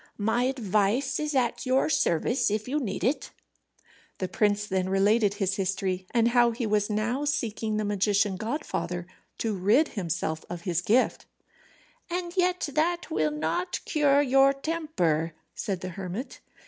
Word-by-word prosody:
My 225 +4 +1
advice 230 0 +1
is 300 -1 -2
at 240 -2 +1
your 260 +1 +3
service 235 - +1
if 215 +2 -2
you 290 +4 0
need 220 -9 -4
it." 260 +8 0 0.9
The 185 - -2
prince 205 +2 +1
then 190 -2 -1
related 200 +2 +3
his 195 -2 -1
history, 190 -1 -2
and 235 -1 +3
how 240 0 +4
he 235 +1 -3
was 210 -1 +1
now 225 +6 -1
seeking 225 -7 -1
the 215 - -1
magician 205 -1 +1
godfather, 210 - -3 0.3
to 225 -2 -1
rid 215 - +3
himself 170 -5 -3
of 175 -1 -5
his 175 -1 -1
gift. 230 +8 +1 0.8
"And 350 0 -3
yet 360 -2 +1
that 340 +3 0
will 155 - +1
not 160 - -2
cure 290 -2 +3
your 270 0 +5
temper," 275 - -1 0.2
said 195 -5 -3
the 185 - -4
hermit. 190 +7 -6
215 Hz, 150 wpm, -27 LUFS, 190-270 Hz, 0.9 s, your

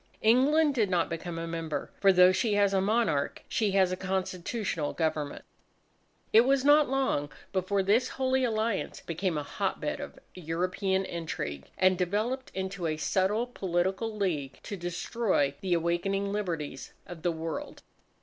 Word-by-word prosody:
England 280 +7 +4
did 220 -6 +1
not 175 -2 +1
become 165 0 -4
a 165 - -3
member 165 -3 -4
for 195 -1 +6
though 180 0 +7
she 210 +2 +1
has 200 -1 +3
a 190 - +3
monarch, 195 -9 0
she 210 -4 0
has 190 -2 +4
a - - 0
Constitutional 185 -2 -2
Government. 155 -3 -2 0.9
It 225 - +9
was 270 +2 +2
not 290 -1 +6
long 260 - 0 0.2
before 195 +1 +1
this 215 +6 +3
Holy 260 0 0
Alliance 220 -3 -1
became 170 0 -2
a 150 - -2
hotbed - - -2
of - - -8 0.2
European 185 +3 -1
intrigue, 160 - -5
and 185 -1 +3
developed 215 +9 -1
into 190 -2 -3
a 155 -1 -1
subtle 195 +8 +1
political 195 0 -1
league 155 -10 -2
to 205 - -5
destroy 175 -3 0
the 185 -2 +1
awakening 185 +4 0
liberties 165 -9 -4
of 175 -2 -9
the 175 - +1
World. 160 -1 -5
190 Hz, 150 wpm, -29 LUFS, 170-215 Hz, 0.9 s, It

